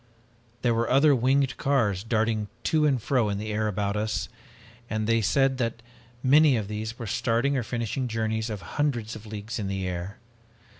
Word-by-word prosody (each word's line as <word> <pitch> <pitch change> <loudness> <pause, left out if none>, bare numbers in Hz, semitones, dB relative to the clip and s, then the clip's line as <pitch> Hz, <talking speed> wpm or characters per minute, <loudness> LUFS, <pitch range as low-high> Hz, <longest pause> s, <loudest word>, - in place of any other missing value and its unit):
"There 120 -2 +3
were 115 +1 0
other 140 +3 +5
winged 135 +2 +2
cars 110 -9 +1
darting 110 -1 0 0.2
to 155 -1 +3
and 135 -4 +2
fro 120 -1 +1
in 100 - -1
the 110 +1 -4
air 110 +1 0
about 100 0 -1
us, 110 +1 -2 0.6
and 110 0 -1
they 115 +1 +2
said 130 +5 +2
that 115 -1 -2 0.4
many 145 0 +6
of 105 -3 -3
these 110 +2 -5
were 120 - -6
starting 120 +6 +1
or 130 - +1
finishing 120 +2 -2
journeys 110 -1 -1
of 105 -3 -5 0.2
hundreds 120 -7 -1
of 110 0 -10
leagues 110 +2 -5
in 100 - -2
the 95 -1 -2
air. 90 +2 -5
115 Hz, 185 wpm, -26 LUFS, 105-130 Hz, 0.6 s, many